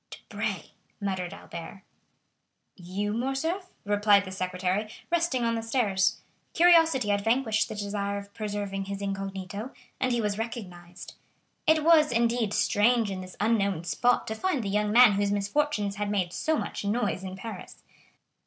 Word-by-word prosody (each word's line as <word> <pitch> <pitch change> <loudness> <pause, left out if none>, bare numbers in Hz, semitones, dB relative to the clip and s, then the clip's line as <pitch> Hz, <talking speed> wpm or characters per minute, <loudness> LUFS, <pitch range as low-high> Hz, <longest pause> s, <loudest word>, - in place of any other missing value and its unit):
"Debray!" - - -5 0.3
muttered 190 -3 -3
Albert. 170 +3 -9 0.9
"You, 195 +3 -3
Morcerf?" 270 - -2 0.2
replied 205 0 +4
the 185 - -7
secretary, 185 +2 -2 0.2
resting 335 -7 +1
on 230 0 +1
the 225 - -1
stairs. 215 -4 +1 0.3
Curiosity 325 -9 +5
had 200 0 +2
vanquished 225 -1 +1
the - - -5
desire 200 -1 -2
of 200 0 -9
preserving 205 -2 -4
his 200 0 -5
incognito, 195 +2 -4 0.3
and 255 - +1
he 240 - +1
was 210 -1 -1
recognized. 180 -6 -7 0.5
It 315 -1 +4
was, 315 -3 +5
indeed, 235 -2 +1
strange 220 +1 +2
in 185 -1 -4
this 185 -1 -10
unknown 200 -5 +1
spot 210 +10 +1
to 220 - -3
find 280 +2 -1
the 200 - -3
young 210 +1 +1
man 245 0 +8
whose 200 0 0
misfortunes 205 0 0
had 205 0 -2
made 185 -4 -1
so 315 0 0
much - - -4
noise 205 -2 -1
in 190 0 -6
Paris. 195 -1 -9
205 Hz, 155 wpm, -27 LUFS, 195-240 Hz, 0.9 s, man